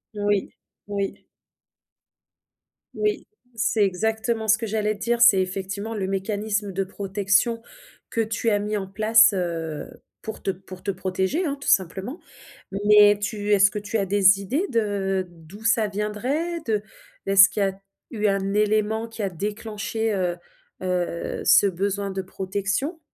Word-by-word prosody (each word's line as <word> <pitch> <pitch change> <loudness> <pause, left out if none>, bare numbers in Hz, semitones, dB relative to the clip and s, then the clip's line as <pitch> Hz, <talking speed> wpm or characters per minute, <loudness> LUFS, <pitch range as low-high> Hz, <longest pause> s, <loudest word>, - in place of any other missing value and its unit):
Oui, 205 -1 0 0.4
oui. 200 -1 -4 1.7
Oui, 425 0 -1 0.3
c'est 220 -1 +1
exactement 220 +4 -1
ce 215 +1 +5
que 225 -1 -4
j'allais 215 0 0
dire, 235 +3 -1
c'est 210 -6 +7
effectivement 195 +4 -4
le 195 -2 -2
mécanisme 205 +1 -2
de 195 +1 -1
protection, 205 +4 0 0.5
que 230 - +1
tu 225 +1 -1
as 205 - +2
mis 210 +1 -2
en 195 - -3
place, 220 +2 +5
heu, 165 -4 -3 0.3
pour 220 - -8
te 195 - +1
pour 185 0 -12
te 200 - -1
protéger, 190 - -1
hein, 285 -1 -2
tout - - -8
simplement, 190 - +1 0.5
mais 205 +1 +5
tu 205 0 -3
est-ce 200 -1 +5
que 210 - -3
tu 210 +2 -3
as 200 - 0
des 195 0 +5
idées 285 - -1
de 200 -4 0
d'où 175 +5 -14
ça 225 -1 +3
viendrait 250 - -2
de 210 -2 0 0.4
est-ce 195 0 +7
qu'il 205 - -1
y - - +3
a, 195 0 -3 0.3
eu 215 -2 0
un 195 0 0
élément 215 +2 +1
qui 225 -2 -6
a 195 - 0
déclenché, 210 +3 -3
heu 180 -3 -1 0.5
heu, 180 -2 -2
ce - - +6
besoin 195 +2 -2
de 190 0 -3
protection? 205 - -3
205 Hz, 155 wpm, -24 LUFS, 195-220 Hz, 1.7 s, c'est